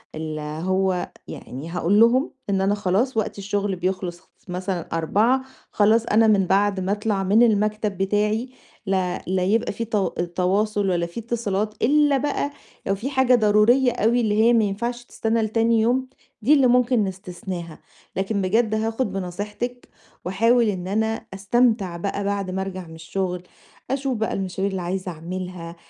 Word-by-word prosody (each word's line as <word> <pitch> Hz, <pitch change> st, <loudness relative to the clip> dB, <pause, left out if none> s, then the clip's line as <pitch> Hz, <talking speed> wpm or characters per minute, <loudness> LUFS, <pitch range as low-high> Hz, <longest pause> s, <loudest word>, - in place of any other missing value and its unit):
ال 155 Hz, -1 st, -4 dB
هو 180 Hz, +5 st, -1 dB, 0.2 s
يعني 140 Hz, +6 st, -8 dB
هاقول 180 Hz, +4 st, +2 dB
لهم 240 Hz, +5 st, +4 dB, 0.2 s
إن 195 Hz, -1 st, +1 dB
أنا 195 Hz, +2 st, +2 dB
خلاص 210 Hz, +5 st, 0 dB
وقت 215 Hz, -, -1 dB
الشغل 200 Hz, 0 st, -1 dB
بيخلص 180 Hz, -1 st, -4 dB, 0.2 s
مثلًا 180 Hz, -1 st, -4 dB
16:00 220 Hz, +11 st, +2 dB, 0.3 s
خلاص 220 Hz, +2 st, +3 dB
أنا 225 Hz, 0 st, +4 dB
من 200 Hz, -3 st, +4 dB
بعد 200 Hz, +1 st, +2 dB
ما 190 Hz, +1 st, -1 dB
أطلع 205 Hz, -1 st, 0 dB
من 210 Hz, +5 st, +4 dB
المكتب 215 Hz, -2 st, +1 dB
بتاعي 210 Hz, +5 st, 0 dB, 0.4 s
لا 190 Hz, -2 st, -1 dB
لا 185 Hz, 0 st, 0 dB
يبقى 215 Hz, +5 st, +1 dB
في 230 Hz, +3 st, -4 dB
ت 220 Hz, -1 st, -4 dB, 0.4 s
تواصل 200 Hz, +2 st, +1 dB
ولا 175 Hz, -2 st, +1 dB
في 170 Hz, +6 st, -7 dB
اتصالات، 215 Hz, -2 st, -2 dB
إلَّا 290 Hz, +2 st, +4 dB
بقى 285 Hz, +1 st, -1 dB, 0.4 s
لو 195 Hz, -, +2 dB
في 235 Hz, +8 st, -4 dB
حاجة 260 Hz, -2 st, +4 dB
ضرورية 230 Hz, +4 st, +4 dB
أوي 235 Hz, +1 st, +2 dB
اللي 215 Hz, -1 st, +2 dB
هي 235 Hz, +1 st, +5 dB
ما 230 Hz, -2 st, +4 dB
ينفعش 235 Hz, +4 st, -2 dB
تستنى 225 Hz, -1 st, -1 dB
لتاني 225 Hz, +1 st, +2 dB
يوم، 255 Hz, +3 st, +1 dB, 0.3 s
دي 255 Hz, +8 st, +4 dB
اللي 275 Hz, -4 st, +5 dB
ممكن 245 Hz, -2 st, +3 dB
نستثناها. 180 Hz, -3 st, -6 dB, 0.4 s
لكن 195 Hz, +2 st, -1 dB
بجد 220 Hz, +4 st, +1 dB
هاخد 225 Hz, +1 st, -1 dB
بنصيحتِك 205 Hz, +6 st, -5 dB, 0.4 s
وأحاول 230 Hz, +6 st, +3 dB
إن 185 Hz, -2 st, -3 dB
أنا 220 Hz, +2 st, -1 dB
أستمتع 200 Hz, -2 st, +1 dB
بقى 200 Hz, +3 st, -3 dB
بعد 200 Hz, -2 st, -2 dB
ما 190 Hz, -, -2 dB
أرجع 185 Hz, -2 st, -5 dB
من 160 Hz, -, -11 dB
الشغل، 180 Hz, +2 st, -3 dB, 0.5 s
أشوف 270 Hz, -2 st, -1 dB
بقى 220 Hz, 0 st, -1 dB
المشاوير 190 Hz, +1 st, -2 dB
اللي 190 Hz, -1 st, -3 dB
عايزة 185 Hz, +1 st, -3 dB
أعملها، 175 Hz, +1 st, -6 dB
205 Hz, 160 wpm, -23 LUFS, 185-230 Hz, 0.5 s, هي